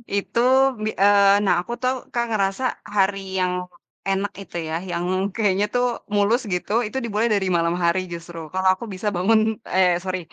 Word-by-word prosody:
Itu 200 +3 -1 0.4
bi 215 - 0
eee 200 0 +5
nah, 195 - +4
aku 235 - -6
tuh 255 0 +1 0.2
Kak, 235 0 0
ngerasa 200 +2 0 0.3
hari 195 0 +2 0.2
yang 180 0 +1 0.6
enak 195 +1 0
itu 195 - -13
ya, 160 - -2 0.2
yang 170 0 -2 0.3
kayaknya 205 -2 +2
tuh 245 0 +3 0.3
mulus 205 +5 +3
gitu, 180 +3 -3 0.2
itu 240 - -6
dimulai 225 0 0
dari 195 -2 0
malam 170 0 +1
hari 170 +2 +3
justru. 170 0 -8 0.2
Kalau 190 0 +2
aku 190 +5 -7
bisa 190 +3 -4
bangun 205 +6 +3 0.4
eee, 180 -2 +4
sori 185 -1 -2
195 Hz, 175 wpm, -22 LUFS, 185-210 Hz, 0.6 s, eee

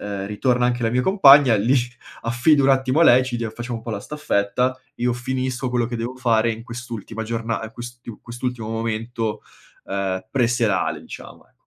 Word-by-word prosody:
uhm, 100 -1 -4
ritorna 120 +4 +1
anche 120 0 -1
la 115 - +1
mia 125 - +1
compagna 145 - +7
li 115 +7 +2 0.5
affido 125 +6 +3
un - - +4
attimo 130 +3 +2
a - - +7
lei 125 -2 +7
e - - -2
ci 125 -2 -3
dia 115 -1 -2
facciamo 120 +1 -5
un - - -13
po' 115 - -5
la 100 - -3
staffetta, 125 -1 -1 0.2
io 120 0 0
finisco 130 0 -3
quello 120 -2 +1
che 120 0 -4
devo 120 +3 -4
fare 115 -2 +2
in 115 +1 -8
quest'ultima 115 -2 -7
giorna 115 0 -2
a 110 0 -7
quest'iu 120 -1 -10
quest'ultimo 120 -1 -5
momento, 115 0 -3 0.4
uhm, 95 0 -3
pre-serale 120 -6 +1
diciamo, - - -11
ecco. - - -35
120 Hz, 190 wpm, -22 LUFS, 110-125 Hz, 0.5 s, compagna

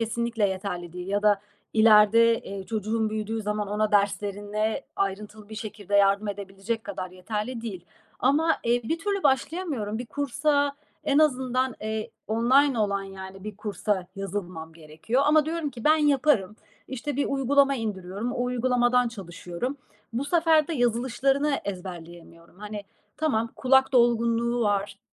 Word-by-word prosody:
kesinlikle 230 -2 0
yeterli 180 -3 -4
değil 180 0 -7
ya 205 +1 0
da 205 -2 +4 0.3
ileride, 225 +1 +6
eee, 195 -1 -7
çocuğum 220 0 -1
büyüdüğü 215 +1 -3
zaman 210 0 -2
ona 210 +1 0
derslerine 205 +1 0
ayrıntılı 205 +2 -3
bir 220 - -8
şekilde 210 -2 -6
yardım 200 +1 +3
edebilecek 200 +2 -4
kadar 185 -2 -5
yeterli 210 +6 -4
değil. 190 -7 -6 0.4
Ama, 305 +5 +3
eee, 240 +1 +2
bir 325 +8 -1
türlü 400 +2 -2
başlayamıyorum. 270 - 0
Bir 245 - -5
kursa, 285 +1 0 0.3
en 285 0 +3
azından, 260 -4 +2
eee, 220 0 -3 0.2
online 245 +4 +3
olan, 200 -2 0
yani, 190 0 -9
bir 210 -2 -6
kursa 205 -3 -2
yazılmam 180 -5 -5
gerekiyor 160 - -2
ama 305 0 +5
diyorum 320 -2 -2
ki 240 -3 -10
ben 310 +1 +6
yaparım. 275 -9 +2 0.3
İşte, 265 +2 -4
bir 285 - +1
uygulama 275 +1 +3
indiriyorum, 205 0 -4
o 245 - -1
uygulamadan 250 0 +2
çalışıyorum. 195 +3 -6 0.4
Bu 250 +4 -2
sefer 320 -1 +3
de 330 - -2
yazılışlarını 265 +4 +1
ezberleyemiyorum. 175 -2 -9
Hani, 210 0 -7 0.3
tamam 235 -8 0
kulak 265 +1 +4
dolgunluğu 235 0 +2
var, 200 -1 0
220 Hz, 140 wpm, -26 LUFS, 200-260 Hz, 0.4 s, ileride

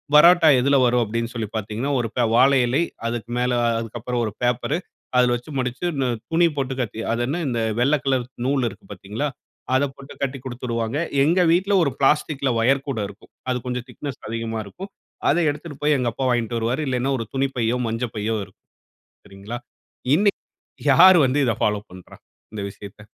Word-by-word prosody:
பரோட்டா 165 +1 +8
எதுல 140 +2 +3
வரும் 120 0 +3
அப்படினு 115 +2 -3
சொல்லி 110 -4 -3
பாத்தீங்கன்னா, 110 +6 -3
ஒரு 115 - -1
ப 120 - +3
வாழை 135 +2 +5
இலை, 135 +7 +2 0.2
அதுக்கு 115 0 -4
மேல 125 0 +1 0.3
அதுக்கப்புறம் 120 +2 -3
ஒரு 105 - -4
பேப்பரு, 125 +6 0 0.4
அதில 125 -1 +4
வச்சு 120 +5 -8
மடிச்சு 125 +4 -3
இந்த 135 -2 0 0.2
துணி 170 +1 +4
போட்டு 135 -1 -1
கட்டி 110 -1 -4
அதென்ன, 125 +9 -1
இந்த 120 -2 -1 0.2
வெள்ள 140 +4 +4
கலர் 130 -2 +1 0.2
நூல் 135 -2 +1
இருக்கு 95 - -15
பாத்தீங்களா, 105 +10 -4 0.5
அத 130 - +3
போட்டு 140 +1 -12
கட்டிக் 135 -2 -3
குடுத்துடுவாங்க. 120 -1 -3 0.3
எங்க 170 +5 +3
வீட்ல 195 +4 +1
ஒரு 140 - +1
பிளாஸ்டிக்‌ல 140 -1 +2
வயர் 135 +4 +2
கூட 125 -5 -2
இருக்கும். 100 - -16 0.2
அது 125 - +1
கொஞ்சம் 125 -1 -3
திக்னெஸ் 140 -4 -7
அதிகமா 115 0 -3
இருக்கும். 190 - -9 0.4
அத 155 - +3
எடுத்துட்டு 150 0 -6
போய் 150 0 +4
எங்க 125 -2 0
அப்பா 130 +2 -2
வாங்கிட்டு 120 -1 0
வருவாரு. 120 +6 -1
இல்லைனா 125 +1 0
ஒரு 115 - -3
துணிப்பையோ, 125 -3 0
மஞ்சப்பையோ 115 -1 -2
இருக்கும், - - -25 0.6
சரிங்களா? 100 +4 -7 0.6
இன்னைக்கு 200 +4 +2 0.5
யார் 180 +6 +8
வந்து 130 +3 +1
இத 115 -4 +1
ஃபாலோ 105 -1 +1
பண்றா? 90 -1 -13 0.4
இந்த 105 - -4
விஷயத்த? 100 +1 -12
125 Hz, 170 wpm, -22 LUFS, 115-140 Hz, 0.6 s, பரோட்டா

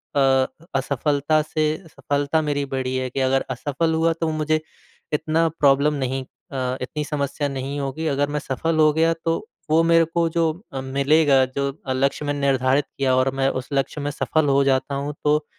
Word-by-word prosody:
अ - - +3
अ, 135 -1 +4 0.3
असफ़लता 145 +3 +1
से 155 +1 -2 0.2
सफ़लता 145 0 -1
मेरी 145 -2 -1
बड़ी 130 -1 -1
है 130 0 -2
कि 130 - -4
अगर 135 +1 +2
असफ़ल 145 +6 -1
हुआ 165 +1 +2
तो 165 - +1
मुझे 155 0 0 0.5
इतना 155 +2 +1
प्रॉब्लम 145 -1 +3
नहीं 135 -1 -2
अ, 130 -1 -5
इतनी 150 +4 -3
समस्या 145 0 -2
नहीं 135 +1 -4
होगी 140 +4 -3
अगर 145 -1 0
मैं 150 0 -1
सफ़ल 155 +4 -2
हो 155 -1 +6
गया 165 +2 +3
तो 165 0 +2 0.3
वो 160 +1 +5
मेरे 165 0 +5
को 165 +1 0
जो 165 -1 +1 0.2
अ, 135 - -3
मिलेगा 140 +1 +3
जो 140 +2 -2 0.2
अ, 130 - 0
लक्ष्य 140 +3 0
मैं 145 - 0
निर्धारित 135 -1 +2
किया 130 -2 +2
और 130 +1 +2
मैं 135 0 +2
उस 125 - -18
लक्ष्य 140 +2 -1
में 145 0 -2
सफ़ल 155 +1 0
हो 140 0 +4
जाता 135 +1 +1
हूँ 140 +2 -3
तो 150 0 +2
145 Hz, 190 wpm, -22 LUFS, 135-155 Hz, 0.5 s, हो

